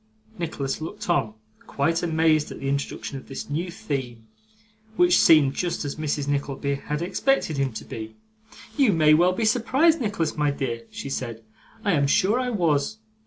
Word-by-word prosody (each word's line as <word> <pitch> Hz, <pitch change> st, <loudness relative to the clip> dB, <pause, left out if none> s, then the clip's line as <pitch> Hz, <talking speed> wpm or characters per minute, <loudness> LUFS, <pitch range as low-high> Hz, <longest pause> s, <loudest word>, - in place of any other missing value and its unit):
Nicholas 150 Hz, -4 st, -3 dB
looked 160 Hz, -, -6 dB
on, 110 Hz, -11 st, 0 dB, 0.3 s
quite 165 Hz, +4 st, 0 dB
amazed 160 Hz, -2 st, +2 dB
at -, -, -8 dB
the 135 Hz, -, -4 dB
introduction 140 Hz, 0 st, -3 dB
of -, -, -17 dB
this 135 Hz, +1 st, -7 dB
new 170 Hz, +5 st, -2 dB
theme. 130 Hz, -8 st, -5 dB, 0.7 s
Which 355 Hz, 0 st, +5 dB
seemed 145 Hz, -4 st, +6 dB
just 175 Hz, +1 st, -2 dB
what 145 Hz, +2 st, -5 dB
Mrs. 145 Hz, -1 st, -1 dB
Nickleby 140 Hz, 0 st, -1 dB
had 150 Hz, +3 st, -3 dB
expected 185 Hz, -, 0 dB
him 135 Hz, -1 st, 0 dB
to 110 Hz, -, -7 dB
be. 110 Hz, 0 st, -7 dB, 0.6 s
'You 270 Hz, -8 st, +4 dB
may 155 Hz, -2 st, +5 dB
well 175 Hz, +4 st, +4 dB
be 220 Hz, +4 st, -1 dB
surprised, 265 Hz, +8 st, +3 dB
Nicholas, 200 Hz, -8 st, -1 dB
my 150 Hz, -1 st, +1 dB
dear,' 120 Hz, -5 st, -3 dB
she 140 Hz, -, -7 dB
said, 115 Hz, -4 st, -4 dB, 0.4 s
'I 200 Hz, -, +3 dB
am 140 Hz, -3 st, +2 dB
sure 200 Hz, -, +3 dB
I 255 Hz, -1 st, -1 dB
was. 170 Hz, -3 st, 0 dB
155 Hz, 170 wpm, -24 LUFS, 140-180 Hz, 0.7 s, seemed